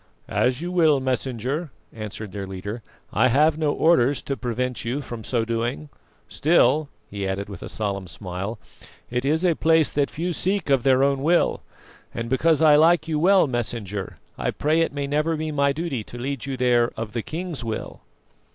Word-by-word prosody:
"As 125 Hz, +3 st, +1 dB
you 175 Hz, -, -3 dB
will, 160 Hz, -5 st, +4 dB
Messenger," 130 Hz, +4 st, -2 dB, 0.2 s
answered 105 Hz, -2 st, -7 dB
their 100 Hz, -1 st, -5 dB
leader; 100 Hz, +5 st, -6 dB, 0.3 s
"I 115 Hz, +5 st, +4 dB
have 150 Hz, +5 st, +3 dB
no 150 Hz, -2 st, +2 dB
orders 145 Hz, -5 st, +3 dB
to 140 Hz, -, -2 dB
prevent 125 Hz, 0 st, -3 dB
you 120 Hz, +4 st, -2 dB
from 120 Hz, -5 st, -7 dB
so 115 Hz, -1 st, 0 dB
doing. 120 Hz, +6 st, -2 dB, 0.4 s
Still," 150 Hz, -1 st, +3 dB, 0.2 s
he 100 Hz, -1 st, -3 dB
added 100 Hz, +1 st, -3 dB
with 100 Hz, -, -9 dB
a -, -, -7 dB
solemn 100 Hz, -3 st, -3 dB
smile, 90 Hz, +6 st, -5 dB, 0.5 s
"it 125 Hz, +1 st, -1 dB
is 160 Hz, +5 st, +2 dB
a 175 Hz, -, +4 dB
place 160 Hz, -1 st, +3 dB
that 145 Hz, -1 st, +1 dB
few 175 Hz, +3 st, -3 dB
seek 190 Hz, -3 st, 0 dB
of 135 Hz, -2 st, +4 dB
their 130 Hz, +1 st, +4 dB
own 140 Hz, -1 st, +2 dB
will, 170 Hz, +4 st, +2 dB, 0.5 s
and, 115 Hz, 0 st, -4 dB
because 160 Hz, +4 st, +3 dB
I 150 Hz, -2 st, +7 dB
like 165 Hz, +1 st, +4 dB
you 155 Hz, -2 st, 0 dB
well, 190 Hz, +3 st, +5 dB
Messenger, 110 Hz, -6 st, -3 dB, 0.2 s
I -, -, 0 dB
pray 155 Hz, +3 st, +1 dB
it 165 Hz, -, +1 dB
may 140 Hz, 0 st, -3 dB
never 150 Hz, +3 st, 0 dB
be 155 Hz, 0 st, -3 dB
my 140 Hz, -1 st, +2 dB
duty 140 Hz, -6 st, -3 dB
to 120 Hz, -, -9 dB
lead 135 Hz, +2 st, -4 dB
you 135 Hz, -1 st, -3 dB
there 120 Hz, -1 st, +3 dB
of 110 Hz, -2 st, -5 dB
the 115 Hz, -, -1 dB
king's 165 Hz, 0 st, -5 dB
will." 110 Hz, -1 st, -5 dB
135 Hz, 190 wpm, -24 LUFS, 115-155 Hz, 0.5 s, I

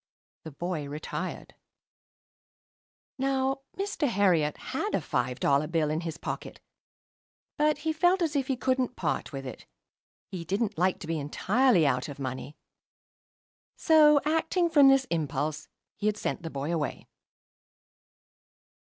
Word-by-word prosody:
The 160 Hz, -, -7 dB
boy 155 Hz, -1 st, -4 dB
retired. 150 Hz, +2 st, -5 dB, 1.7 s
Now, 270 Hz, 0 st, 0 dB, 0.2 s
Mr. 390 Hz, -6 st, -1 dB
Herriot 180 Hz, -, +2 dB
had -, -, -1 dB
a -, -, +2 dB
five 125 Hz, -, -2 dB
dollar 140 Hz, +2 st, +2 dB
bill 160 Hz, -2 st, 0 dB
in 155 Hz, +2 st, -1 dB
his 165 Hz, -2 st, -5 dB
pocket; -, -, -6 dB, 1.0 s
but, 300 Hz, 0 st, +2 dB
he 320 Hz, -, +1 dB
felt 355 Hz, +3 st, +3 dB
as 315 Hz, -2 st, -1 dB
if 270 Hz, -2 st, 0 dB
he 265 Hz, -, -1 dB
couldn't 255 Hz, -1 st, 0 dB
part -, -, -2 dB
with 135 Hz, -2 st, -6 dB
it. 130 Hz, -, -9 dB, 0.6 s
He 180 Hz, -3 st, -7 dB
didn't 200 Hz, +5 st, -1 dB
like 185 Hz, +1 st, +2 dB
to -, -, -6 dB
be 160 Hz, 0 st, -2 dB
entirely 190 Hz, -, +2 dB
out 125 Hz, 0 st, 0 dB
of 140 Hz, -, -8 dB
money. 135 Hz, +2 st, -6 dB, 1.2 s
So, 305 Hz, -2 st, +6 dB
acting 325 Hz, +3 st, +1 dB
from 290 Hz, -4 st, +7 dB
this 270 Hz, -1 st, +5 dB
impulse, 150 Hz, -1 st, -2 dB, 0.3 s
he 210 Hz, -, -1 dB
had 210 Hz, 0 st, +1 dB
sent 205 Hz, -, -3 dB
the 165 Hz, -, -5 dB
boy 145 Hz, +3 st, -3 dB
away. 150 Hz, -5 st, -3 dB
185 Hz, 140 wpm, -28 LUFS, -, 1.7 s, from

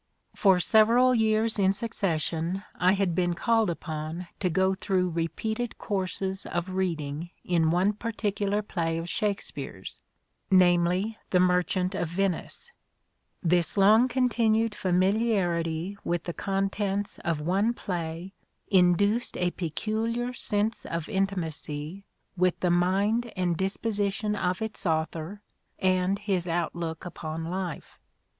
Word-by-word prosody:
For 190 Hz, -3 st, +4 dB
several 230 Hz, +6 st, +5 dB
years 220 Hz, -1 st, +2 dB
in 190 Hz, 0 st, +4 dB
succession 180 Hz, -4 st, -2 dB
I 180 Hz, +1 st, +3 dB
had 195 Hz, -3 st, +1 dB
been 175 Hz, 0 st, +1 dB
called 225 Hz, +1 st, +2 dB
upon 160 Hz, +1 st, -5 dB
to 185 Hz, -, +1 dB
go 190 Hz, +2 st, +2 dB
through 185 Hz, -1 st, 0 dB
repeated 220 Hz, +8 st, -2 dB
courses 190 Hz, -1 st, -2 dB
of 175 Hz, +2 st, -2 dB
reading 165 Hz, -4 st, -2 dB, 0.2 s
in 165 Hz, -3 st, +2 dB
one 180 Hz, +5 st, +2 dB
particular 210 Hz, -2 st, -1 dB
play 165 Hz, -5 st, -2 dB
of 165 Hz, +1 st, -4 dB
Shakespeare's, 175 Hz, -, -4 dB, 0.5 s
namely 180 Hz, +3 st, +3 dB
" -, -, -44 dB
The 180 Hz, -, +3 dB
Merchant 180 Hz, +1 st, +2 dB
of 175 Hz, -3 st, -1 dB
Venice." 195 Hz, -, -2 dB, 0.7 s
This 175 Hz, +2 st, +1 dB
long 215 Hz, +5 st, +6 dB
continued 230 Hz, -3 st, +2 dB
familiarity 185 Hz, -2 st, +1 dB
with 175 Hz, -1 st, -1 dB
the 175 Hz, -, -4 dB
contents 195 Hz, +1 st, -2 dB
of 165 Hz, -3 st, -1 dB
one 190 Hz, +8 st, +1 dB
play 175 Hz, -3 st, -4 dB, 0.4 s
induced 200 Hz, +5 st, +3 dB
a 180 Hz, 0 st, +1 dB
peculiar 225 Hz, +9 st, -2 dB
sense 215 Hz, -2 st, -1 dB
of 165 Hz, -2 st, -4 dB
intimacy 175 Hz, -2 st, -3 dB, 0.3 s
with 180 Hz, -1 st, +1 dB
the 180 Hz, -, +2 dB
mind 200 Hz, +7 st, +2 dB
and 180 Hz, -2 st, 0 dB
disposition 205 Hz, +2 st, -1 dB
of 185 Hz, +1 st, -1 dB
its 220 Hz, -3 st, -4 dB
author 160 Hz, +5 st, -2 dB, 0.3 s
and 185 Hz, +1 st, +2 dB
his 195 Hz, -4 st, -1 dB
outlook 165 Hz, -1 st, -2 dB
upon 160 Hz, -2 st, -5 dB
life. 180 Hz, -1 st, -5 dB
185 Hz, 125 wpm, -27 LUFS, 170-210 Hz, 0.7 s, long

